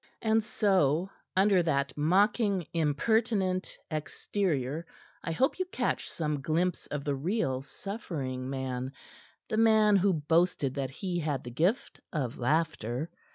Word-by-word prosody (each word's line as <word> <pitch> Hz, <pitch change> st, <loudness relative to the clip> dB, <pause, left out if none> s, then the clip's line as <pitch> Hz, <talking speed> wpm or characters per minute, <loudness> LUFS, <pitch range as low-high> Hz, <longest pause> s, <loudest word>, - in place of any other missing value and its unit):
And 220 Hz, 0 st, +3 dB
so, 190 Hz, -, +2 dB, 0.2 s
under 190 Hz, -1 st, +5 dB
that 140 Hz, -5 st, 0 dB
mocking, 195 Hz, +4 st, +2 dB
impertinent 185 Hz, -, +1 dB
exterior, 155 Hz, -2 st, -2 dB, 0.4 s
I -, -, -2 dB
hope 265 Hz, -, +1 dB
you 370 Hz, -, +1 dB
catch 375 Hz, +6 st, -2 dB
some 150 Hz, -3 st, -2 dB
glimpse 170 Hz, +5 st, 0 dB
of 145 Hz, -1 st, -4 dB
the 145 Hz, -, 0 dB
real, 140 Hz, -, -1 dB
suffering 135 Hz, -, -5 dB
man 130 Hz, -1 st, -3 dB, 0.5 s
the 215 Hz, -, -2 dB
man 220 Hz, -2 st, +5 dB
who 195 Hz, 0 st, +3 dB
boasted 160 Hz, -2 st, +2 dB
that 135 Hz, -2 st, -2 dB
he 175 Hz, +5 st, -3 dB
had 150 Hz, -5 st, -2 dB
the 120 Hz, -, -7 dB
gift 175 Hz, -, 0 dB
of 135 Hz, -8 st, -3 dB
laughter. 150 Hz, -1 st, 0 dB
165 Hz, 130 wpm, -30 LUFS, 140-200 Hz, 0.5 s, under